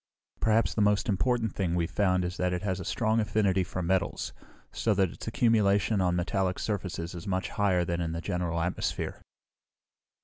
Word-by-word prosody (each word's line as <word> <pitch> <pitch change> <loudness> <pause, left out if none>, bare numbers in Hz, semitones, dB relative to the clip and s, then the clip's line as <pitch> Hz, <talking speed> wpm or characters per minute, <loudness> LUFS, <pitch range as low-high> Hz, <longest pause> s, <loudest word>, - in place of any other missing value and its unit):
"Perhaps 110 +1 +2
the 110 - 0
most 105 +1 +3
important 115 +2 +1
thing 90 -3 -1
we've 85 -1 -1
found 90 -3 +2
is 90 0 -4
that 90 0 0
it 90 - -3
has 95 -2 -1
a - - -4
strong 110 +4 +1
affinity 100 -3 +2
for 90 +1 -4
metals, 95 +1 -1 0.4
so 110 -2 0
that 95 -3 +2
its - - -10
accumulation 110 -3 +3
on 90 -1 +2
metallic 95 +1 0
surfaces 95 -4 -3
is 90 +3 -8
much 95 0 -1
higher 95 -4 +1
than 85 0 -1
in 80 -1 -2
the 85 - -3
general 85 0 -2
atmosphere." 90 +2 -2
95 Hz, 180 wpm, -29 LUFS, 90-105 Hz, 0.4 s, most